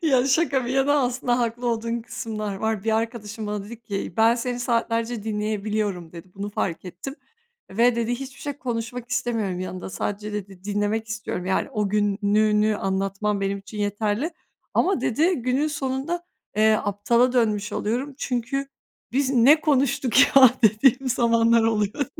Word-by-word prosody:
Ya, 265 Hz, -5 st, +3 dB
şaka 275 Hz, -2 st, +2 dB
bir 245 Hz, -, -3 dB
yana, 270 Hz, +2 st, +3 dB
aslında 245 Hz, 0 st, 0 dB
haklı 240 Hz, 0 st, -2 dB
olduğun 230 Hz, 0 st, -1 dB
kısımlar 215 Hz, -3 st, -5 dB
var. 220 Hz, 0 st, -2 dB
Bir 220 Hz, 0 st, +2 dB
arkadaşım 225 Hz, -1 st, -4 dB
bana 210 Hz, -1 st, -3 dB
dedi 225 Hz, +2 st, -10 dB
ki 205 Hz, -3 st, -4 dB
"Ben 225 Hz, +1 st, +5 dB
seni 245 Hz, 0 st, -3 dB
saatlerce 230 Hz, -1 st, -1 dB
dinleyebiliyorum," 210 Hz, -4 st, -2 dB
dedi. 170 Hz, +1 st, -11 dB
"Bunu 200 Hz, +1 st, -5 dB
fark 185 Hz, -3 st, -3 dB
ettim 180 Hz, +10 st, -7 dB, 0.6 s
ve" 235 Hz, +4 st, +3 dB
dedi, 235 Hz, 0 st, -1 dB
"hiçbir 270 Hz, +1 st, -9 dB
şey 285 Hz, -1 st, -3 dB
konuşmak 240 Hz, -1 st, -4 dB
istemiyorum 220 Hz, -7 st, -1 dB
yanında. 185 Hz, 0 st, -5 dB
Sadece" 210 Hz, +2 st, -4 dB
dedi, 195 Hz, -3 st, -7 dB
"dinlemek 205 Hz, +2 st, -1 dB
istiyorum. 215 Hz, -4 st, -4 dB
Yani 190 Hz, +8 st, 0 dB
o 210 Hz, -6 st, -1 dB
gününü 210 Hz, +1 st, +2 dB
anlatman 195 Hz, +2 st, -1 dB
benim 195 Hz, 0 st, -1 dB
için 200 Hz, +2 st, -11 dB
yeterli 210 Hz, -, -1 dB, 0.4 s
ama" 370 Hz, -8 st, +2 dB
dedi, 320 Hz, +11 st, +2 dB
"günün 255 Hz, +4 st, 0 dB
sonunda, 290 Hz, +4 st, -3 dB, 0.3 s
eee, 215 Hz, +1 st, +5 dB
aptala 235 Hz, +5 st, +2 dB
dönmüş 215 Hz, -3 st, +1 dB
oluyorum. 250 Hz, +7 st, -2 dB
Çünkü 265 Hz, +1 st, -2 dB, 0.4 s
'Biz 265 Hz, +1 st, +1 dB
ne 275 Hz, +4 st, +6 dB
konuştuk 265 Hz, -4 st, +2 dB, 0.2 s
ya?' 265 Hz, -2 st, +10 dB
dediğim 255 Hz, +5 st, +4 dB
zamanlar 230 Hz, -1 st, +3 dB
oluyor." 225 Hz, +4 st, 0 dB
225 Hz, 150 wpm, -24 LUFS, 205-250 Hz, 0.6 s, ya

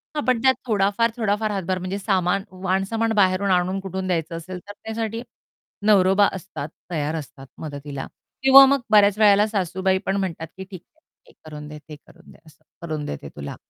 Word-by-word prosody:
हां, 295 Hz, -, -1 dB
पण 250 Hz, -3 st, +2 dB
त्यात 260 Hz, 0 st, +5 dB
थोडाफार, 205 Hz, +2 st, +2 dB
थोडाफार 215 Hz, -1 st, 0 dB
हातभार 190 Hz, -2 st, -2 dB
म्हणजे 185 Hz, +2 st, -4 dB
सामान, 195 Hz, -1 st, 0 dB, 0.2 s
वाणसामान 195 Hz, +5 st, 0 dB
बाहेरून 190 Hz, 0 st, +2 dB
आणून 185 Hz, +2 st, +1 dB
कुठून 190 Hz, 0 st, -5 dB
द्यायचं 165 Hz, -2 st, -2 dB
असेल, 180 Hz, +2 st, -7 dB
तर 205 Hz, -, -8 dB
त्यासाठी 225 Hz, 0 st, -4 dB, 0.7 s
नवरोबा 195 Hz, 0 st, +5 dB
असतात, 185 Hz, -5 st, -7 dB, 0.2 s
तयार 155 Hz, 0 st, -2 dB
असतात 135 Hz, -3 st, -8 dB
मदतीला. 145 Hz, -2 st, -6 dB, 0.4 s
किंवा 270 Hz, 0 st, +10 dB
मग 275 Hz, -1 st, +2 dB
बऱ्याच 205 Hz, -1 st, +5 dB
वेळेला 205 Hz, 0 st, +5 dB
सासूबाई 190 Hz, -2 st, 0 dB
पण 195 Hz, -, 0 dB
म्हणतात 170 Hz, -4 st, -3 dB
की, 190 Hz, -, -6 dB
"ठीक 185 Hz, -2 st, -11 dB
आहे. 315 Hz, -, -36 dB, 0.2 s
हे -, -, -19 dB
करून 150 Hz, -1 st, -9 dB
दे, 150 Hz, 0 st, -9 dB
ते 150 Hz, -, -7 dB
करून 175 Hz, +2 st, -18 dB
दे -, -, -17 dB
असं 155 Hz, 0 st, -21 dB, 0.2 s
करून 155 Hz, -3 st, -4 dB
देते 70 Hz, -, -6 dB
तुला." 70 Hz, -1 st, -7 dB
190 Hz, 180 wpm, -23 LUFS, 165-210 Hz, 0.7 s, किंवा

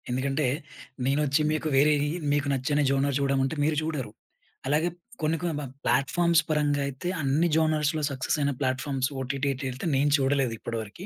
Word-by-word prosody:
ఎందుకంటే 135 Hz, +4 st, 0 dB, 0.6 s
నేనొచ్చి 145 Hz, +2 st, +2 dB
మీకు 155 Hz, 0 st, -1 dB
వేరేయి 145 Hz, +1 st, +3 dB, 0.2 s
మీకు 145 Hz, 0 st, 0 dB
నచ్చని 145 Hz, +3 st, +1 dB
జోనర్ 140 Hz, 0 st, +1 dB
జూడమంటే 135 Hz, +1 st, +1 dB
మీరు 155 Hz, +1 st, +2 dB
జూడరు. 150 Hz, -8 st, -3 dB, 0.6 s
అలాగే 155 Hz, +5 st, +2 dB, 0.3 s
కొన్ని 155 Hz, +1 st, +1 dB
కొన్ని 170 Hz, -3 st, -1 dB
బం 140 Hz, -3 st, -5 dB, 0.2 s
ప్లాట్‌ఫామ్స్ 170 Hz, +4 st, +3 dB
పరంగా 145 Hz, -2 st, +1 dB
అయితే 140 Hz, +5 st, -6 dB
అన్ని 145 Hz, +5 st, +2 dB
జోనర్స్‌లో 155 Hz, -1 st, +1 dB
సక్సెస్ 135 Hz, +2 st, -1 dB
అయిన 145 Hz, -1 st, +1 dB
ప్లాట్‌ఫామ్స్ 130 Hz, 0 st, -1 dB
ఓటీటీటీల్తే 135 Hz, 0 st, -3 dB
నేను 140 Hz, +2 st, +3 dB
చూడలేదు 135 Hz, -3 st, +1 dB
ఇప్పడివరకి. 115 Hz, -, -6 dB
140 Hz, 140 wpm, -27 LUFS, 135-155 Hz, 0.6 s, వేరేయి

